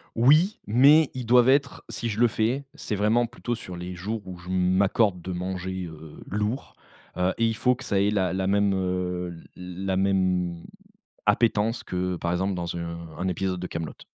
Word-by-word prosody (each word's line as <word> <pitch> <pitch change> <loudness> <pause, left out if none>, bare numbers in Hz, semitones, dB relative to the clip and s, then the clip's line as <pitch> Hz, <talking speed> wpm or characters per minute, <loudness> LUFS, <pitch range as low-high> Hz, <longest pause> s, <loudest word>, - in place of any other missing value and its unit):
Oui, 155 - +4
mais 140 +7 +6
ils 125 -2 -5
doivent 125 +2 +5
être 140 0 +2
si 115 - -3
je 105 - -3
le 120 - +6
fais, 120 +5 -1
c'est 105 - -4
vraiment 110 +4 +2
plutôt 120 +1 -4
sur 95 -5 -8
les 90 +1 -6
jours 105 +5 -4
où 90 -1 -8
je 90 +1 -12
m'accorde 95 +1 +2
de 95 - -5
manger, 90 0 -4
heu, 80 -1 -12
lourd, 105 +6 -3 0.4
heu, 90 +1 +1
et 115 - +2
il 115 - +1
faut 125 +3 +2
que 135 - -11
ça 100 -5 0
ait 100 - +3
la 95 -3 +1
la 95 0 -1
même, 100 0 +3
heu, 90 -1 -2 0.2
l 90 +1 -7
la 95 -1 0
même 90 -3 +1 0.6
appétence 110 +1 +2
que, 90 0 -2
par 85 0 -2
exemple, 95 +2 0
dans 85 -1 -4
un 85 0 -4 0.2
un 95 - -1
épisode 90 0 -2
de 90 - -3
Kaamelott. 85 -2 -6
95 Hz, 195 wpm, -26 LUFS, 90-115 Hz, 0.6 s, mais